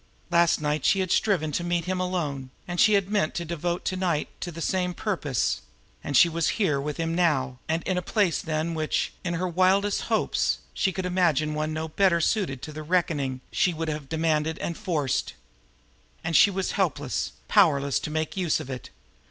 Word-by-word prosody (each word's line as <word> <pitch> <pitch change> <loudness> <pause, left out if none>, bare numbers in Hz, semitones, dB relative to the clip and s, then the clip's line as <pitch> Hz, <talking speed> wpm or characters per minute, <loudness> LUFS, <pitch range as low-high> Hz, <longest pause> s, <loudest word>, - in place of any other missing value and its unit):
Last 170 0 +4
night 150 -1 -1
she 195 - +3
had 185 -2 -1
striven 175 -8 +2
to 170 - -1
meet 175 -1 -1
him 185 0 -1
alone, 155 -8 -2 0.2
and 175 0 0
she 215 - +6
had 200 -1 +2
meant 205 -7 +1
to 170 - -2
devote 170 +2 -3
to 185 - -1
night 175 -5 0
to 175 - -4
the 165 - -9
same 180 +1 -1
purpose; 150 - -1 0.4
and 140 - +1
she - - +8
was 165 -1 0
here 155 -11 +1
with 150 +1 -4
him 165 0 -1
now, 140 -7 +1
and 165 +1 0
in 185 -1 0
a - - -4
place 195 -2 +1
than 160 +1 -2
which, 155 -1 -1
in 170 -1 -1
her 180 +2 -1
wildest 190 +3 +2
hopes, - - +1 0.2
she 190 - +1
could 190 0 -4
have 180 - -2
imagined 155 -4 +2
one 155 +1 -1
no 155 +1 -3
better 170 +1 +3
suited 165 - 0
to 155 - -6
the 155 - -6
reckoning 150 -6 0
she 180 -3 +1
would 160 0 -3
have 150 -3 -5
demanded 160 -1 0
and 170 - -3
forced. 150 -8 -1 0.9
And 165 0 -1
she 200 - +7
was 190 -1 -2
helpless, - - -1
powerless 140 - +3
to - - -5
make 155 0 -2
use 180 -5 +1
of 135 - -7
it. 125 -4 -7
165 Hz, 200 wpm, -26 LUFS, 150-180 Hz, 0.9 s, she